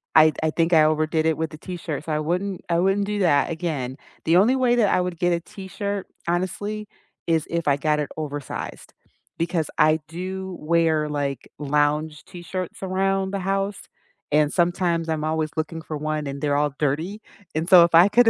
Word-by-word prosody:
I 155 0 +8
I 160 - +2
think 165 +1 +1
I 155 -1 +7
overdid 155 +1 +1
it 160 -1 +2
with 160 -1 -1
the 155 - -9
t-shirt, 165 -4 -5
so 160 - -4
I 150 - +1
wouldn't 180 +4 -2
I 170 0 +2
wouldn't 195 +2 +2
do 210 0 -2
that 165 -6 +3
again. 150 -6 -3 0.3
The 165 +2 +5
only 235 +8 +5
way 250 -2 +3
that 220 -4 +3
I - - +3
would 180 -2 -4
get 175 -1 +2
a 170 - +1
t-shirt, 200 +2 -5 0.2
honestly, 205 +4 -2 0.4
is 165 -2 +2
if 170 -2 -2
I 140 0 +4
got 150 0 +1
it 145 - -2
oversized, 145 -2 -6 0.4
because 165 -1 -1
I 155 0 +4
do 185 +2 -5
wear, 160 -1 +2
like, 140 -3 -3
lounge 150 +1 0
t-shirts 180 +1 -6
around 190 +1 0
the 200 - -2
house, 195 +2 -1 0.5
and 150 0 +3
sometimes, 170 -2 +1
I'm 155 -1 -1
always 155 -1 -1
looking 160 +1 -3
for 155 - -5
one 155 0 -2
and 140 0 -5
they're 145 -1 +1
all 145 -1 +1
dirty, 160 +9 -1 0.3
and 160 +3 -1
so 180 -3 +9
if 170 - +1
I 170 +4 +8
could 240 +2 +5
165 Hz, 195 wpm, -24 LUFS, 155-185 Hz, 0.5 s, so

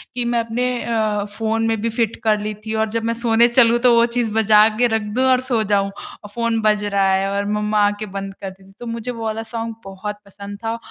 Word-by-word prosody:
कि 245 -1 -2
मैं 235 0 +1
अपने 235 +2 -1
अ, 215 -3 0
फ़ोन 225 +2 -1
में 225 -1 0
भी 230 - 0
फ़िट 225 -1 -1
कर 215 -1 +2
ली 210 +1 -4
थी। 220 - -3
और 220 0 0
जब 230 0 -2
मैं 230 0 0
सोने 235 0 +3
चलूँ 240 -1 +4
तो 245 -1 +4
वो 235 0 +5
चीज़ 235 -2 -2
बजा 215 -1 +5
के 245 0 +4
रख 225 -1 0
दूँ 260 +1 +2
और 255 0 +3
सो 245 -4 0
जाऊँ। 200 -1 +1 0.3
और 205 - -10
फ़ोन 230 -1 0
बज 210 -1 +2
रहा 200 -1 +1
है 195 +1 +1
और 200 0 -1
मम्मा 210 0 0
आके 205 +1 -3
बंद 195 0 -6
करती 190 0 -8
थी। - - -18
तो 240 - -8
मुझे 250 +2 -4
वो 230 -1 -7
वाला 220 +1 -3
सॉन्ग 225 0 -5
बहुत 195 +2 -6
पसंद 200 +1 -10
था 225 +1 -2
220 Hz, 250 wpm, -20 LUFS, 205-230 Hz, 0.3 s, वो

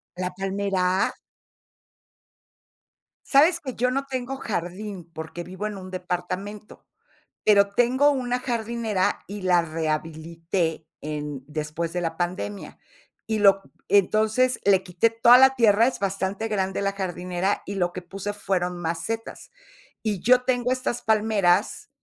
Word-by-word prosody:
¿La 180 0 -3
palmera? 195 0 0 2.1
Sabes 320 +5 +5
que 260 -4 -5
yo 250 +2 +1
no 275 +2 -1
tengo 260 0 -4
jardín, 185 -3 -5
porque 160 +2 -6
vivo 185 +4 -6
en 210 -2 -4
un 185 0 -9
departamento, 185 +3 -5 0.6
pero 200 -1 +6
tengo 255 +5 +4
una 250 -3 0
jardinera, 230 -5 -1
y 205 0 -7
la 180 -2 +4
rehabilité 160 +1 -3
en 150 -3 -5
después 155 +2 -4
de 180 - -1
la 165 -1 -3
pandemia. 185 +3 -4 0.5
Y 220 -1 0
lo 195 -1 +5 0.3
entonces, 215 +6 +3
le 195 -2 +5
quité 185 +4 +1
toda 235 +2 +7
la 265 +1 +7
tierra, 225 -2 +5
es 265 - -2
bastante 195 +2 -2
grande 195 -2 -1
la 200 0 0
jardinera, 180 0 -2
y 200 - -5
lo 175 -2 0
que 185 - -5
puse 195 +3 -5
fueron 180 -3 -2
macetas. 170 +7 -4 0.5
Y 210 -4 -1
yo 250 +1 +5
tengo 250 -1 0
estas 255 -2 -1
palmeras, 210 -3 +2
195 Hz, 135 wpm, -25 LUFS, 175-225 Hz, 2.1 s, toda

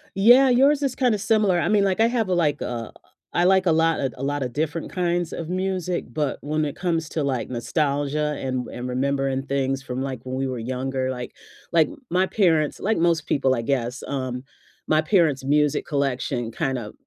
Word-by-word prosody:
Yeah, 245 +7 +7
yours 275 +4 +4
is 270 -2 0
kinda 245 -5 +1
similar. 210 -3 +2
I - - 0
mean, 205 -2 +3
like, 195 +2 0
I 225 - +6
have 230 -4 0
a 180 - +1
like, 150 -4 +1
uh 115 -2 -4 0.4
I 175 - +2
like 190 0 +4
a 170 - +4
lotta 160 -4 +2
a - - -6
a - - -1
lotta 140 -2 -1
different 155 +5 -3
kinds 175 -2 -1
of 165 -1 -5
music, 185 -6 -2
but 150 0 -1
when 155 +1 -1
it 145 - -3
comes 165 -3 -1
to, 155 - -2
like, 130 -4 -1
nostalgia, 145 +3 -1
and 130 -2 -3
and 125 +1 -6
remembering 135 +1 0
things 135 -1 -1
from, 130 0 -4
like, 130 -3 -4
when 130 0 -5
we 135 0 -1
were 130 - -4
younger, 130 +2 -2
like 125 -1 -6 0.4
like, 160 -3 +4 0.2
my 185 +2 +2
parents 165 -8 +1
like 220 +3 0
most 165 -2 +1
people, 135 -2 +2
I 115 - -2
guess, 125 0 -2
um, 130 -2 -3 0.5
my 155 - +4
parents' 155 -6 +2
music 145 +1 +2
collection 130 -4 -1
kinda 125 -4 -3
150 Hz, 195 wpm, -23 LUFS, 130-180 Hz, 0.5 s, Yeah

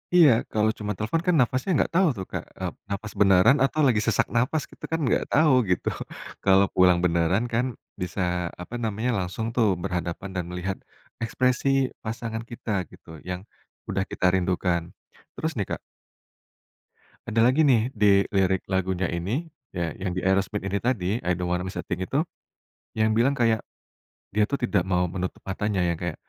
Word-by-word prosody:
Iya, 160 -6 +8 0.2
kalau 110 0 +3
cuma 105 -1 -3
telepon 110 - -1
kan 180 - +4
nafasnya 130 +9 +1
nggak - - +1
tau 185 -1 +5
tuh 95 - -4
Kak, - - -3 0.2
eee, - - -2 0.2
nafas 100 +2 -4
beneran 100 +7 +6
atau 155 +3 0
lagi 110 -4 +3
sesak 115 -4 +1
nafas 130 +6 +1
kita - - -18
kan 165 - 0
nggak - - +2
tau 155 -2 +5 0.2
gitu. 90 - 0 0.6
Kalau 95 0 +5
pulang 90 -1 +5
beneran 85 +5 +2
kan, 120 +3 +2 0.4
bisa 90 +1 -3 0.4
apa 100 +7 -7
namanya, 110 +3 -1
langsung 95 +5 -4
tuh 115 -3 +4 0.2
berhadapan 90 +2 -3
dan 90 -2 -2
melihat, 90 +2 -3 0.5
ekspresi 125 +3 +1 0.4
pasangan 115 0 -4
kita 115 -2 -7 0.2
gitu, - - -17 0.2
yang, 90 0 -3 0.5
udah 95 -2 0
kita - - -2
rindukan. 90 -1 +1 0.5
Terus 160 +1 -2
nih 100 -5 -2
Kak - - -2 1.5
ada 115 - 0
lagi 130 +5 +4
nih, 130 -4 +3
di 100 -2 +4
lirik 95 -1 +2
lagunya 95 -1 0
ini, 95 - -2 0.3
ya 85 -2 -1
yang 95 - -1
di 90 - -2
Aerosmith 95 +1 +1
ini 100 +1 -1
tadi, 115 -8 0
I 90 +1 +1
Don't 90 0 -1
Want 90 - 0
to 90 - -5
Miss - - -7
a - - -4
Thing 90 +1 -3
itu. 140 - 0 0.7
Yang 110 0 +3
bilang 120 +5 +3
kayak, 115 -3 +2 0.7
dia 105 +1 +2
tuh 140 - -3
tidak 100 -7 +1
mau 90 -2 +1
menutup 90 0 -4
matanya, 95 0 -1
yang 85 -2 0
kayak, 85 -3 -3
100 Hz, 175 wpm, -25 LUFS, 90-120 Hz, 1.5 s, Iya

